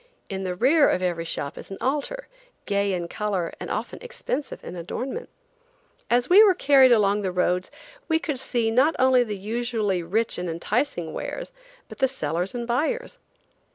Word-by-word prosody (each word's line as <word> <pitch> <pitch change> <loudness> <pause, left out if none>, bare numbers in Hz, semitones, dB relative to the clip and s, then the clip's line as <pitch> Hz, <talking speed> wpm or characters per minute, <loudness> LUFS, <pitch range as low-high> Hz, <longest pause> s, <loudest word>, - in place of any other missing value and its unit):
In 190 -1 -4
the 180 -1 -2
rear 285 - +4
of 185 - 0
every 170 -2 -1
shop 145 -2 -4
is - - -10
an 195 - -7
altar, 300 - -2 0.4
gay 200 -1 +1
in 175 -2 -2
color 190 -3 -2
and - - -6
often - - -4
expensive 485 - -5
in - - -7
adornment. 250 - -5 0.8
As 240 +1 +2
we 395 +4 +8
were 390 -4 +5
carried 275 -5 +6
along 210 -2 +3
the 190 -2 -1
roads 180 0 0 0.4
we 320 - +3
could 295 -5 -2
see 235 -3 +1
not 270 +7 +3
only 255 -1 +5
the 210 -4 -5
usually 220 -3 -1
rich 210 +7 0
and 180 -1 -3
enticing 175 - -2
wares, - - -5 0.4
but - - -12
the 265 - +4
sellers 180 - -3
and 240 -1 -3
buyers. 470 - -1
225 Hz, 175 wpm, -25 LUFS, 185-270 Hz, 0.8 s, we